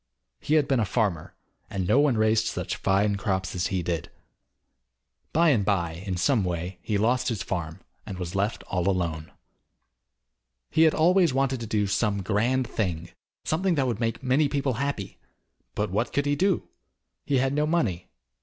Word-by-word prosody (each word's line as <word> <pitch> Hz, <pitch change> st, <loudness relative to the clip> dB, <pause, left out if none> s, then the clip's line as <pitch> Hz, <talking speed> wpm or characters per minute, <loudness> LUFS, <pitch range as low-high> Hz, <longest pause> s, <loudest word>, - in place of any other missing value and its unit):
He 155 Hz, -, 0 dB
had 150 Hz, -3 st, +3 dB
been 135 Hz, -3 st, +2 dB
a 110 Hz, -, +2 dB
farmer, 95 Hz, -6 st, -1 dB, 0.3 s
and 100 Hz, -4 st, -2 dB
no 130 Hz, -, +4 dB
one 145 Hz, -5 st, +3 dB
raised 110 Hz, +1 st, +2 dB
such -, -, -3 dB
fine 100 Hz, +1 st, +1 dB
crops 95 Hz, -2 st, -2 dB
as 90 Hz, -1 st, -1 dB
he 95 Hz, -3 st, -2 dB
did. 85 Hz, -1 st, -3 dB, 1.2 s
By 165 Hz, +2 st, +4 dB
and 120 Hz, -9 st, +3 dB
by, 95 Hz, -5 st, 0 dB, 0.2 s
in 95 Hz, -2 st, -2 dB
some 115 Hz, +3 st, +2 dB
way, 90 Hz, 0 st, -3 dB
he 105 Hz, -, -1 dB
lost 120 Hz, +5 st, +1 dB
his 110 Hz, -7 st, -2 dB
farm, 85 Hz, -3 st, -4 dB, 0.2 s
and 95 Hz, -, -7 dB
was 90 Hz, -1 st, -5 dB
left 100 Hz, +3 st, -1 dB
all 90 Hz, 0 st, -1 dB
alone. 85 Hz, -4 st, -2 dB, 1.4 s
He 160 Hz, -, +5 dB
had -, -, -4 dB
always 170 Hz, -3 st, +4 dB
wanted 135 Hz, -1 st, +1 dB
to 115 Hz, -, -5 dB
do 105 Hz, -1 st, +1 dB
some 100 Hz, 0 st, 0 dB
grand 115 Hz, +7 st, +1 dB
thing, 85 Hz, -7 st, -3 dB, 0.3 s
something 175 Hz, +3 st, +1 dB
that 135 Hz, -3 st, +1 dB
would 120 Hz, -4 st, -2 dB
make 115 Hz, +1 st, -2 dB
many 140 Hz, +3 st, +2 dB
people 140 Hz, -2 st, 0 dB
happy, 140 Hz, -9 st, -3 dB, 0.6 s
but 105 Hz, -2 st, -1 dB
what 110 Hz, +5 st, -1 dB
could 140 Hz, -, +1 dB
he 145 Hz, 0 st, +1 dB
do? 190 Hz, +2 st, +1 dB, 0.6 s
He 140 Hz, -, +1 dB
had 135 Hz, +1 st, +1 dB
no 150 Hz, +1 st, +1 dB
money. 115 Hz, -, 0 dB
110 Hz, 180 wpm, -26 LUFS, 95-135 Hz, 1.4 s, He